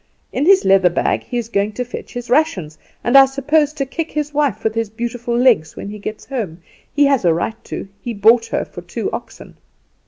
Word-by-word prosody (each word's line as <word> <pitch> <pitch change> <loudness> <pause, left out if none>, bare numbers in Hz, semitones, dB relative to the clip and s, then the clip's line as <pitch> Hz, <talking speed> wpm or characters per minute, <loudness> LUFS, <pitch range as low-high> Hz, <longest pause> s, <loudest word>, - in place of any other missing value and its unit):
In 280 +5 0
his 390 0 +6
leather 190 -1 +5
bag 175 - 0
he 245 - -4
is 235 -2 -2
going 210 -1 -1
to 250 +3 -3
fetch 245 - -8
his 245 0 -5
rations, 210 - +1 0.3
and 240 - +1
I 270 0 +9
suppose 290 +3 +1
to 285 -3 -2
kick 320 +4 -4
his 300 -1 -2
wife 280 -8 0
with 220 - 0
his 225 -2 -2
beautiful 235 +2 -3
legs 230 -11 +3
when 200 - -7
he 210 +1 -8
gets 215 +2 -6
home. 195 - -5 0.3
He 290 0 +3
has 275 -5 +2
a 170 -2 +3
right 220 +7 -3
to; - - -6
he 235 -2 -5
bought 225 +3 +4
her - - -2
for - - -10
two - - -4
oxen. - - -8
240 Hz, 220 wpm, -19 LUFS, 205-275 Hz, 0.3 s, I